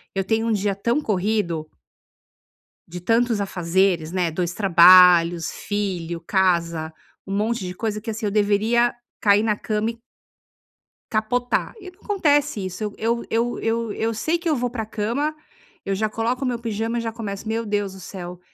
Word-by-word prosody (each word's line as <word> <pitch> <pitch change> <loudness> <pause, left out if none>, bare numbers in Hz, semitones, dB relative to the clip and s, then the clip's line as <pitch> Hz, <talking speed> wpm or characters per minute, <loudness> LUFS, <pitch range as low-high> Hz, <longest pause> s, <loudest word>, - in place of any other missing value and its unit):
eu 195 - 0
tenho 225 +3 0
um 230 - +1
dia 205 -1 0
tão 235 +7 0
corrido 195 - -1 1.2
De 180 +1 -7
tantos 230 +3 +1
afazeres, 180 -3 0
né? 180 -2 0
2 175 +2 -2
trabalhos, 175 -3 +6
filho, 180 -5 -3
casa, 170 -3 0 0.3
um 195 - -5
monte 215 -1 -1
de 180 - -5
coisa 210 +2 -3
que 225 - -6
assim 220 +1 -4
eu 205 - 0
deveria 215 +4 +2 0.3
cair 205 0 +5
na 215 -2 +1
cama 215 +1 -1
e - - -13 1.2
capotar 245 +3 0
e 370 -2 -10
não 360 - -29
acontece 290 - +1
isso. 185 +3 -5
Eu 210 -1 -3
eu 235 +1 -1
eu 235 +2 0
eu 225 -1 -1
eu 225 +1 -1
sei 315 +10 0
que 335 - -2
eu 305 - +2
vou 245 0 -1
para 235 -2 -4
a - - -7
cama, 235 +9 -2 0.5
eu 195 - -1
já 215 +2 0
coloco 235 +5 -2
o - - 0
meu 245 -1 -1
pijama 225 0 -2
e 235 - -1
já 225 - -3
começo 215 -2 -6
"Meu 225 +1 -2
Deus 205 -2 -1
do 190 - -11
céu, 180 -1 -8
210 Hz, 180 wpm, -22 LUFS, 185-230 Hz, 1.2 s, trabalhos